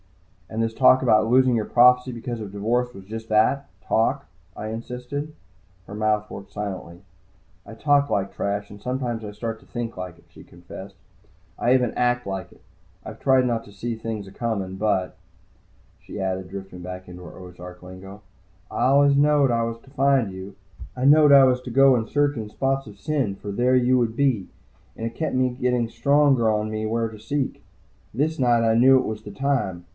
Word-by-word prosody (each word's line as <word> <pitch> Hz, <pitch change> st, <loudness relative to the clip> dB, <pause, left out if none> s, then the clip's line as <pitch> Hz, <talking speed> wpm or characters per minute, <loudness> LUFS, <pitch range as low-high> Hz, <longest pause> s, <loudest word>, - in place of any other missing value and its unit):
"And 110 Hz, -, -3 dB
this 115 Hz, 0 st, -2 dB
talk 130 Hz, +2 st, +5 dB
about 110 Hz, -3 st, +3 dB
losing 130 Hz, 0 st, +4 dB
your 110 Hz, -2 st, 0 dB
prophecy 125 Hz, +1 st, +4 dB
because 120 Hz, -1 st, -5 dB
of 105 Hz, -2 st, -7 dB
divorce 120 Hz, +5 st, -1 dB
was 95 Hz, -3 st, -12 dB
just 110 Hz, +2 st, -8 dB
that, 110 Hz, +6 st, +2 dB
talk?" 135 Hz, +5 st, 0 dB, 0.3 s
I 110 Hz, -, -5 dB
insisted. 125 Hz, +6 st, -6 dB, 0.5 s
Her -, -, -9 dB
mouth 105 Hz, 0 st, 0 dB
worked 100 Hz, -, -10 dB
silently. 95 Hz, -3 st, -6 dB, 0.6 s
"I -, -, -10 dB
talk 140 Hz, +4 st, +2 dB
like 100 Hz, -1 st, -1 dB
trash, 100 Hz, 0 st, -3 dB
and 100 Hz, 0 st, -12 dB
sometimes 125 Hz, -3 st, -3 dB
I 105 Hz, -, -6 dB
start 110 Hz, +2 st, -5 dB
to -, -, -20 dB
think 120 Hz, -1 st, -5 dB
like 90 Hz, -2 st, -7 dB
it," -, -, -23 dB
she -, -, -15 dB
confessed. 95 Hz, +3 st, -12 dB, 0.6 s
"I 120 Hz, -, +2 dB
even 125 Hz, -3 st, +2 dB
act 125 Hz, -2 st, 0 dB
like 95 Hz, -1 st, -5 dB
it. -, -, -19 dB, 0.5 s
I've -, -, -9 dB
tried 130 Hz, -1 st, +3 dB
not 115 Hz, -2 st, -1 dB
to -, -, -14 dB
see 115 Hz, +4 st, -4 dB
things 110 Hz, -2 st, -5 dB
acomin'. 100 Hz, -2 st, -4 dB
But," 95 Hz, -3 st, 0 dB, 0.9 s
she -, -, -9 dB
added, 95 Hz, -1 st, -3 dB
drifting 95 Hz, -2 st, -8 dB
back 90 Hz, +1 st, -8 dB
into 90 Hz, 0 st, -10 dB
her 85 Hz, -, -11 dB
Ozark 90 Hz, 0 st, -11 dB
lingo. 95 Hz, +3 st, -11 dB, 0.5 s
"Always 140 Hz, +2 st, +3 dB
I 140 Hz, -, +4 dB
knowed 145 Hz, -3 st, +3 dB
I 115 Hz, -1 st, +1 dB
was 115 Hz, 0 st, -3 dB
to 135 Hz, -, -19 dB
find 135 Hz, -6 st, +2 dB
you. 95 Hz, +1 st, -9 dB, 0.4 s
I 125 Hz, -, -1 dB
knowed 150 Hz, +1 st, +7 dB
I 140 Hz, -1 st, +8 dB
was 125 Hz, -1 st, +2 dB
to 125 Hz, -, -8 dB
go 135 Hz, +1 st, +6 dB
and 115 Hz, -2 st, -2 dB
search 145 Hz, 0 st, +1 dB
in 110 Hz, -3 st, -5 dB
spots 135 Hz, +3 st, -1 dB
of 100 Hz, -1 st, -13 dB
sin, 135 Hz, -9 st, -1 dB
for 100 Hz, +1 st, -7 dB
there 125 Hz, +5 st, +2 dB
you 125 Hz, 0 st, +3 dB
would 115 Hz, -1 st, -1 dB
be. 130 Hz, -9 st, +1 dB, 0.5 s
And 115 Hz, -, -4 dB
it 115 Hz, -, -5 dB
kept 160 Hz, -5 st, -2 dB, 0.2 s
getting 125 Hz, -2 st, +1 dB
stronger 135 Hz, 0 st, +3 dB
on 105 Hz, 0 st, -1 dB
me 110 Hz, 0 st, -3 dB
where 115 Hz, +1 st, 0 dB
to 110 Hz, -1 st, -11 dB
seek. 135 Hz, +5 st, -3 dB, 0.5 s
This 155 Hz, +7 st, 0 dB
night 120 Hz, -3 st, +3 dB
I -, -, +3 dB
knew 130 Hz, +3 st, +6 dB
it 130 Hz, -, 0 dB
was 110 Hz, 0 st, -4 dB
the 105 Hz, -, -10 dB
time. 100 Hz, -9 st, -2 dB
115 Hz, 195 wpm, -23 LUFS, 100-130 Hz, 0.9 s, I